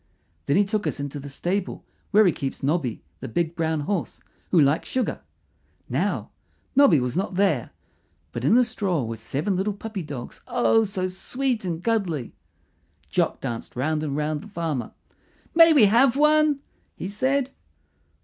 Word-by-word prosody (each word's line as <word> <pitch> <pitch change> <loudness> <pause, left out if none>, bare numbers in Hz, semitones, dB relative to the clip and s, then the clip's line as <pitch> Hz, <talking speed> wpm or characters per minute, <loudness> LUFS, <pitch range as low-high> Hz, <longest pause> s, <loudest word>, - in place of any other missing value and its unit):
Then 140 - +3
he 205 - +4
took 210 +1 -1
us - - -2
into 145 0 -4
the 140 +1 -8
stable 180 +7 -3 0.2
where 210 +1 +5
he 180 - +5
keeps 135 -3 -5
Nobby, 140 -5 -1 0.2
the - - -6
big 165 +7 -1
brown 160 -2 0
horse, 190 +3 -3 0.3
who 180 - +4
likes 145 +1 +2
sugar. 260 -1 -1 0.7
Now - - -1 0.4
Nobby 270 - +6
was 125 +1 -2
not 190 +1 -2
there, 195 +1 +1 0.6
but - - -5
in - - +4
the 250 - +6
straw 185 - -1
were 115 0 -4
seven 145 - -2
little 195 +3 0
puppy 210 0 -6
dogs 140 -6 -7
oh, 225 -2 +3
so 190 -2 -2
sweet 235 +5 -2
and 170 -1 -3
cuddly! 185 - -1 0.8
Jock - - 0
danced 115 -1 -5
round 150 +5 0
and 145 -2 -2
round 150 0 -1
the 210 - -11
farmer. 165 - -3 0.6
"May 330 0 +8
we 280 -9 +7
have 240 +5 +4
one?" 300 -1 +4 0.3
he - - -5
said. 260 +6 0
185 Hz, 165 wpm, -24 LUFS, 150-225 Hz, 0.8 s, May